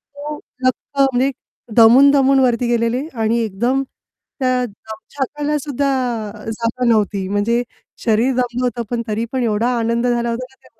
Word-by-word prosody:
हो. 295 +1 -6 0.3
लख्ख 265 +2 -2
म्हणजे 270 0 +2 0.5
दमून-दमून 270 +4 +6
वरती 245 -2 +2
गेलेले 240 +4 0
आणि 225 0 0
एकदम 240 +6 0 0.6
त्या 255 -1 +1
दमछाकाला 265 +7 -4
सुद्धा 285 -1 -2 0.6
जागा 230 +2 -2
नव्हती 205 -4 +1
म्हणजे 210 +4 +1 0.4
शरीर 230 +4 +2
दमलं 250 0 -1
होतं 240 -1 -2
पण 235 - -1
तरी 220 +1 -1
पण 260 -2 -1
एवढा 225 +1 +1
आनंद 235 +1 0
झाला 235 -1 0
होता 235 +2 -3
ना 265 - -24
त्या - - -21
240 Hz, 145 wpm, -19 LUFS, 230-265 Hz, 0.6 s, दमून-दमून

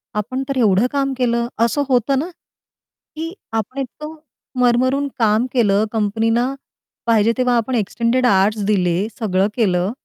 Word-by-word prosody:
आपण 250 +6 -2
तर 275 - -1
एवढं 220 -1 +3
काम 275 -1 0
केलं." 235 -1 0 0.2
असं 285 +5 0
होतं 260 +2 +2
ना? 330 +6 -3 0.9
की 330 +2 -5 0.2
आपण 225 +4 -3
इतकं 300 +4 -6 0.5
मरमरून 255 +3 +2
काम 220 +1 +3
केलं 210 -4 +3
कंपनीला 225 +4 0 0.5
पाहिजे 230 -1 +3
तेव्हा 250 -1 +2
आपण 235 +2 -1
एक्सटेंडेड 235 +3 0
आउअरस् 205 -1 +2
दिले, 185 -1 +1
सगळं 195 -3 +1
केलं 185 -4 +1
235 Hz, 135 wpm, -19 LUFS, 210-255 Hz, 0.9 s, एवढं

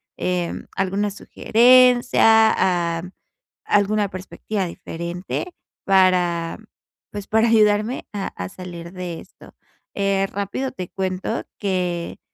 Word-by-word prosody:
em, 180 -2 -3
alguna 195 +2 0
sugerencia, 225 -7 +4
am, 180 +2 -9 0.5
alguna 205 0 +2
perspectiva 185 +2 -4
diferente 170 - -6 0.3
para, 180 -3 +2 0.5
pues, 205 -1 -7
para 220 +1 +3
ayudarme 215 +2 +2
a 200 -2 -3
a 90 0 -5
salir 170 - -9
de 180 -3 -6
esto. - - -17 0.4
Eh, 195 -1 +1
rápido 200 +7 -4
te 185 -8 -7
cuento 190 +3 -3 0.2
que 180 -4 -2
195 Hz, 100 wpm, -21 LUFS, 180-210 Hz, 0.5 s, sugerencia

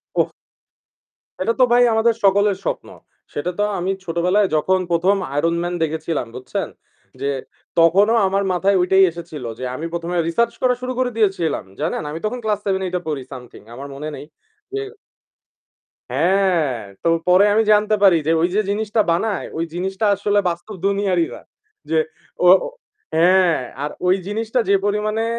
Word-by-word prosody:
ওহ! - - +2 1.1
সেটা 190 +5 +1
তো - - +8
ভাই 245 0 +6
আমাদের 225 +1 +3
সকলের 200 0 +4
স্বপ্ন। - - -3 0.5
সেটা 145 +5 -2
তো - - +2 0.2
আমি 180 +2 -1
ছোটবেলায় 180 +4 +2
যখন 185 +5 +2
১ম, 180 +4 +3 0.2
Iron 165 +3 +1
Man 175 0 -2
দেখেছিলাম 160 -3 -2
বুঝছেন? 125 +1 -4 0.5
যে 140 - -2 0.5
তখনও 195 +7 +5
আমার 195 +1 +1
মাথায় 190 +2 +2
ওইটাই 190 +1 +5
এসেছিল 165 -5 -9
যে 130 - -5
আমি 155 +5 -4
১ম, 170 0 -4
এ - - +2
research 235 +8 +1
করা 250 -1 +3
শুরু 255 0 -3
করে 255 -1 +1
দিয়েছিলাম। 190 - 0 0.2
জানেন, 155 +3 -1
আমি 155 - -5
তখন 215 +4 -2
class 210 -2 0
7-8 190 -2 -1
এ - - -10
পড়ি 150 -4 -3
something 125 -5 -11
আমার 140 +3 -8
মনে 150 +3 -6
নেই। - - -9 0.5
যে - - -1 1.3
হ্যাঁ, 170 -2 +2 0.2
তো - - +1 0.2
পরে 180 +2 +6
আমি 220 - +4
জানতে 210 +1 +3
পারি 190 -4 +7
যে 160 - +3
ওই 170 - +3
যে 210 - +3
জিনিসটা 215 +1 0
বানায় 200 +4 -1
ওই 165 - 0
জিনিসটা 190 +4 -2
আসলে 205 +1 0
বাস্তব 175 +5 -5
দুনিয়ারই 195 -4 +1
না। - - -10 0.5
যে - - +2 0.5
ও - - +5 0.7
হ্যাঁ, 175 0 +4 0.2
আর 145 - -2 0.2
ওই 185 +1 +4
জিনিসটা 225 +4 -1
যে 200 - +4
পরিমাণে 215 +2 0
190 Hz, 165 wpm, -20 LUFS, 165-210 Hz, 1.3 s, তো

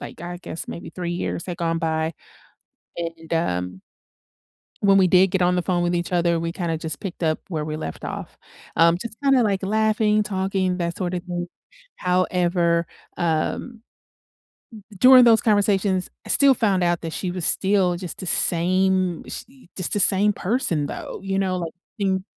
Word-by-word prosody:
like, - - -9
I 175 +1 -6
guess, 165 - -5
maybe 170 - -7
3 175 -1 -4
years 175 0 -3
had 175 -2 -5
gone 165 -1 0
by, 160 -1 -1 0.8
and, 165 -1 -6
um 90 - -2 1.0
when 195 -1 +5
we 185 -1 +5
did 185 +1 +5
get 190 -2 0
on 180 0 +3
the 180 - +1
phone 175 -1 0
with 175 0 0
each 175 +1 -3
other, 170 -1 +2
we 165 - -2
kinda 170 -2 -2
just 160 -1 -5
picked 185 -3 -6
up 155 -1 +1
where 160 -5 -3
we 155 0 -4
left 120 - -7
off. - - -6 0.4
Um, 170 +1 +4
just 235 -1 -6
kinda, 270 -2 +4
like, 200 -2 0
laughing, 215 +1 +2
talking, 190 -2 -1
that 170 -1 -3
sorta 180 -1 -2
thing. 175 -1 -5 0.5
However, 175 -2 +1 0.3
um, 175 +8 -2 1.2
during 255 -1 +8
those 225 -2 +6
conversations, 200 -3 +1 0.2
I - - -11
still 275 -2 +5
found 195 -6 +1
out 175 -1 +1
that 165 -1 -5
she 180 -2 -3
was 180 -3 -3
still 190 -3 +2
just 180 -1 -6
the 185 - -6
same 185 +1 +1
she 255 -5 -9
just 185 - -2
the - - +1
same 200 +2 +4
person, 180 - -1
though, - - -7
you 195 0 -1
know? 185 -1 -1
Like, 165 -2 -4 0.3
thing 190 -2 0
180 Hz, 175 wpm, -23 LUFS, 170-195 Hz, 1.2 s, during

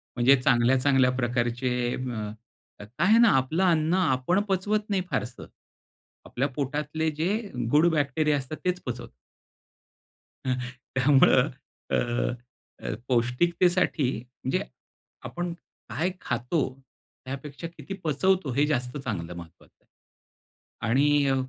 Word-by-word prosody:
म्हणजे 130 +3 +6
चांगल्या-चांगल्या 130 +2 +4
प्रकारचे 120 0 0 0.3
अ, 115 -5 -4 0.5
काय 105 +2 -12 0.2
आहे 220 +2 +6
ना, 235 -2 +7
आपलं 155 +8 0
अन्न 165 -1 +2
आपण 170 0 +2
पचवत 210 +3 0
नाही 195 -2 +1
फारसं. 125 0 -3 0.8
आपल्या 135 +3 -1
पोटातले 150 +3 -1
जे 165 - +1 0.4
गुड 155 +4 +5
बॅक्टेरिया 150 0 +1
असतात 135 +3 -5
तेच 180 0 0
पचवतात. 125 -1 -5 1.4
अ, 130 - +1 0.4
त्यामुळं 135 +1 +5 0.4
अ, - - +1 0.9
अ, - - -2
पौष्टिकतेसाठी, 155 +5 +2 0.3
म्हणजे 130 - 0 0.6
आपण 175 0 -4 0.4
काय 160 - -1
खातो, 125 +6 -1 0.6
त्यापेक्षा 140 +4 -6
किती 195 - -7
पचवतो, 165 +1 +1
हे 145 +3 +3
जास्त 125 -2 -1
चांगलं 90 -10 -4
महत्त्वाचं. 85 0 -14 1.0
आणि 135 +5 +3 0.2
अ, 135 - +2
140 Hz, 110 wpm, -26 LUFS, 125-165 Hz, 1.4 s, ना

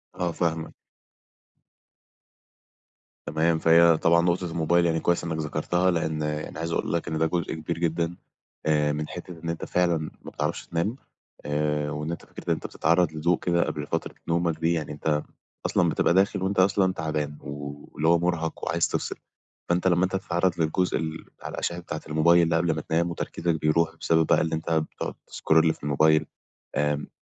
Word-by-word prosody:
آه، 90 -1 -1
فاهمك. 80 -1 -2 2.5
تمام، 80 +1 +1
فهي 85 0 +6
طبعًا 85 +1 +4
نقطة 85 0 0
الموبايل 85 +1 +2
يعني 80 -1 +1
كويس 85 +1 +1
إنّك 80 -2 -2
ذكرتها 90 +4 0
لإن 80 -2 -1
أنا 75 +1 -4
عايز 85 0 -3
أقول - - -1
لك 85 - -1
إن 80 - -2
ده 80 - +2
جزء 85 +1 -1
كبير 80 +1 -4
جدًا 85 0 -1 0.5
آآ 75 -1 +2
من 75 +1 -3
حتّة 90 -1 -8
إن 85 - -3
أنت 85 - -3
فعلًا 90 -2 +2
ما 80 0 -8
بتعرفش - - -3
تنام 85 +8 -1 0.5
آآ 75 0 0
وإن 75 +2 -3
أنت 85 - -6
فكرة - - -11
إن - - +4
أنت - - -5
بتتعرّض 85 +1 +2
لضوء 80 +2 +1
كده 85 -1 +2
قبل 75 -1 -4
فترة 80 - -3
نومك 85 -1 0
دي 85 +1 +2
يعني 80 -4 -3
أنت 75 0 -1 0.4
أصلًا - - +2
بتبقى - - +2
داخل 95 0 +2
وأنت 95 0 0
أصلًا 95 0 +3
تَعبان 75 -2 -3
و 70 0 -7
واللي 80 - 0
هو 85 0 +5
مُرهَق 85 -2 -1
وعايز 85 +1 +1
تفصل، - - -2 0.5
فأنت 90 +2 +2
لمّا 90 0 +3
أنت 95 +1 0
تتعرّض 90 -1 0
للجزء 85 +3 +1
ال 80 +1 -4 0.2
على - - -6
الأشعة 85 - -2
بتاعة 75 -3 -6
الموبايل 85 +3 +4
اللي 85 - +1
قبل 85 -1 +2
ما 80 - -3
تنام 85 +3 0
وتركيزك 85 -1 -2
بيروح 80 +1 +2
بسبب 80 -1 +2
بقى - - +3
اللي 80 0 0
أنت 80 +1 -4
بتقعُد 80 -1 -2 0.2
تscroll 80 0 +3
في - - -21
الموبايل، 80 +2 +3 0.5
آمم 75 0 0
80 Hz, 180 wpm, -26 LUFS, 80-85 Hz, 2.5 s, فهي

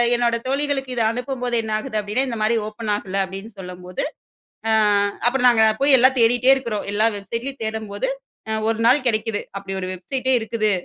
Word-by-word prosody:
என்னோட 240 -1 +1
தோழிகளுக்கு 275 -1 -1
இத 235 - 0
அனுப்பும்போது 250 0 -3
என்ன 220 - -5
ஆகுது 215 0 -4
அப்டீன்னா 210 +6 -1
இந்த 235 -3 -4
மாரி 220 +2 +2
ஓப்பன் 215 0 -4
ஆகல 195 -1 -2
அப்டீன்னு 195 +4 -9
சொல்லும்போது, 180 -1 -6 0.7
அ - - +3 0.6
அப்பறம் 250 0 +3
நாங்க 220 -2 +5 0.2
போய் 275 0 +6
எல்லாம் 260 +2 +4
தேடிட்டே 245 +3 +4
இருக்குறோம், 235 -6 -3
எல்லா 215 +2 +3
வெப்சைட் 230 +4 -5
லயும் 275 -2 -7
தேடும்போது, 220 +2 -3 0.6
ஒரு 225 0 -1
நாள் 255 +4 +4
கெடைக்குது. 220 -2 0 0.2
அப்படி 195 -1 -5
ஒரு 185 - -3
வெப்சைட் 215 +9 -5
டே - - +4
இருக்குது. 220 -1 0
230 Hz, 175 wpm, -21 LUFS, 210-255 Hz, 0.7 s, போய்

